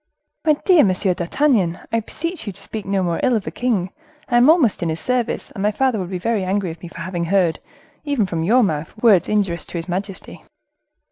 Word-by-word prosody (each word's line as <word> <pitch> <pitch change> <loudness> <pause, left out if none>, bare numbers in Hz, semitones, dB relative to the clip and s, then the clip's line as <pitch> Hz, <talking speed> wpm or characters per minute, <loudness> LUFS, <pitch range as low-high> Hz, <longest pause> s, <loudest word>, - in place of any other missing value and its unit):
"My 305 - +6
dear 360 -6 +6
Monsieur 185 -1 +1
d'Artagnan, 180 - +1
I 230 - +2
beseech 330 - -6
you 200 - -3
speak 200 +2 -6
no 195 -1 +1
more 170 -2 -1
ill 250 - +2
of 215 - -1
the - - -5
king. 210 -7 -1 0.4
I 240 - +3
am 245 +4 +6
almost 315 - +4
in 170 - 0
his 160 +1 -2
service, 250 -2 -1
and 195 - -7
my 205 - +3
father 250 +1 0
would 180 -2 -4
be 185 - -3
very 210 +2 -1
angry 190 0 -1
with 165 0 -9
me 175 - -8
for 170 - -9
having 170 -1 -3
heard, 180 -2 +1 0.4
even 285 -8 0
from 170 -3 -3
your 240 +8 +4
mouth, 155 -5 -2
words 205 -7 +5
injurious 195 -5 0
to - - -6
his 165 - -5
majesty." 190 +2 -5
195 Hz, 220 wpm, -20 LUFS, 175-240 Hz, 0.4 s, My